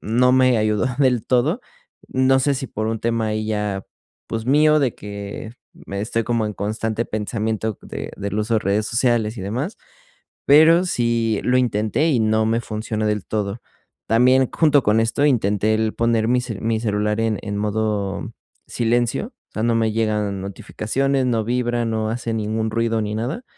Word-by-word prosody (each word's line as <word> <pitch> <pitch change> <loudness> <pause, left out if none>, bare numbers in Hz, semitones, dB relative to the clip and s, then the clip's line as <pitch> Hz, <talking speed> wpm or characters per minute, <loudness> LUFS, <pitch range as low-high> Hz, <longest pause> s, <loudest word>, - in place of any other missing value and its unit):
no 125 +4 +2
me 130 -2 +4
ayudó 110 +2 +1
del 125 -5 +2
todo. 145 - +2 0.5
No 130 0 +3
sé 140 +1 +2
si 135 0 -4
por 110 -1 -4
un 115 0 -2
tema 115 -1 0
ahí 110 0 -2
ya, 105 -3 -2 0.4
pues 115 0 -3
mío, 150 +2 +5
de 130 -4 0
que 100 +2 -7 0.3
me 100 0 -4
estoy 115 +2 -1
como 115 -2 0
en 105 - -3
constante 110 +2 -2
pensamiento 110 0 -3
de - - -6
del 100 +1 -4
uso 110 +2 0
de 110 - +2
redes 105 +2 0
sociales 115 -2 +1
y - - -4
demás, 125 - -3 0.7
pero 160 +5 +6
sí 115 - 0
lo 125 +1 +2
intenté 120 +5 +1
y 130 - +2
no 110 0 +2
me 115 +1 +1
funcionó 110 -1 -3
del 105 -2 -1
todo. 105 +1 -3 0.5
También, 125 +3 +4
junto 150 -4 +3
con 105 +2 +3
esto, 115 +6 +1
intenté 110 -5 +2
el 110 0 0
poner 115 -1 +1
mi 125 0 +3
ce 115 -5 -6
mi 115 0 0
celular 105 -1 0
en 110 -2 0
en 100 -1 -4
modo 105 +1 -2 0.4
silencio, 120 - 0 0.2
o - - -60
sea, 110 - -2
no 115 0 +2
me 110 -1 +1
llegan 105 -3 -1
notificaciones, 130 +7 -1
no 115 -3 +1
vibra, 120 0 0
no 110 -1 -1
hace 115 -1 -3
ningún 110 0 -1
ruido 115 0 0
ni 105 0 -3
nada. 130 - -3
115 Hz, 180 wpm, -21 LUFS, 105-125 Hz, 0.7 s, pero